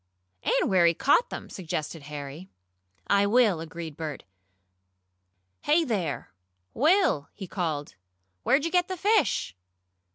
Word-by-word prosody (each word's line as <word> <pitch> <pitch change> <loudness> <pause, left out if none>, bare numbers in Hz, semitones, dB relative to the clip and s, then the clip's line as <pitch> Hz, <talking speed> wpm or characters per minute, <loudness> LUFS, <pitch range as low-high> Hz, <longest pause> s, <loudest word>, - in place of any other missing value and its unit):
"And - - +1
where 180 -3 +4
he 170 - +3
caught 290 - +3
them," - - -7
suggested 165 -3 -5
Harry. 145 +4 -8 0.6
"I 200 0 +3
will," 215 -5 +4
agreed 165 -1 -7
Bert. 155 -3 -5 1.4
"Hey 310 +3 +3
there, 195 - -2 0.4
Will!" 305 - +3
he 200 - -7
called. 160 -6 -3 0.5
"Where'd 280 - +2
you 335 - -1
get 360 -1 +2
the 370 - -4
fish?" 405 - +1
185 Hz, 125 wpm, -27 LUFS, -, 1.4 s, where